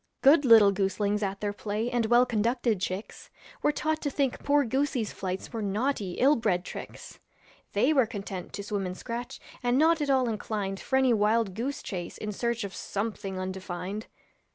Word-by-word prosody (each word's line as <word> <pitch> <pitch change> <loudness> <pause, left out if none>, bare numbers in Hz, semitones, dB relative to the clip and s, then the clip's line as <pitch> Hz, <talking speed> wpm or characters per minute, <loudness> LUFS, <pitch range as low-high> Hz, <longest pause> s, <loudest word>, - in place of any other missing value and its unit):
Good 285 +1 +6
little 220 -4 +8
goslings 200 +1 0
at 195 -1 -2
their 205 -1 -1
play 210 +2 -3
And 240 -2 +1
well 240 +2 +5
conducted 230 -2 0
chicks 185 +4 -5 0.3
Were 295 - +3
taught 310 +1 -1
to 290 - -1
think 275 -2 -1
poor 285 -1 +3
goosey's 260 -2 -1
flights 190 +3 -5
Were 225 - -3
naughty, 205 -1 -1
ill 275 +9 +4
bred 190 -7 0
tricks. - - -9 0.5
They 255 +9 +3
were 260 -6 +4
content 195 -3 -6
to 200 - -5
swim 200 -2 -2
and 180 0 -6
scratch, 240 0 -6 0.2
And 245 0 +2
not 320 +2 +4
at 290 - -1
all 260 -2 +3
inclinded 205 -3 -3
For 265 - -1
any 265 -2 +4
wild 215 -1 +2
goose 265 +8 -3
chase 175 -3 -5
in 210 - -4
search 235 +2 -1
Of 200 -1 -5
something 200 -2 -4
undefined. 185 +2 -5
220 Hz, 180 wpm, -28 LUFS, 195-255 Hz, 0.5 s, little